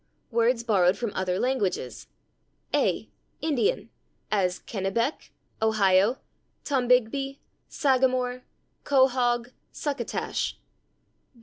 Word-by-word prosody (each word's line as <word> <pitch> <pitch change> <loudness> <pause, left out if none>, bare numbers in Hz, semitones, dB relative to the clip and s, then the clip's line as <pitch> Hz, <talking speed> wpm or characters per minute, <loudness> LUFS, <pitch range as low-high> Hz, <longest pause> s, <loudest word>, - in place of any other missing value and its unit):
Words 235 +1 +2
borrowed 195 -4 +3
from 235 -2 -2
other 185 -1 -1
languages. 230 -6 -1 0.7
a. - - +1 0.3
Indian, 320 - 0 0.4
as 185 -4 +1
/Kennebec/, 220 +7 -2 0.3
/Ohio/, 210 +1 +3 0.5
/Tombigbee/; 260 +1 +1 0.3
/sagamore/, 255 -2 +1 0.4
/quahaug/, 250 -3 +2 0.2
/succotash 275 -6 -3
240 Hz, 75 wpm, -26 LUFS, 205-260 Hz, 0.7 s, borrowed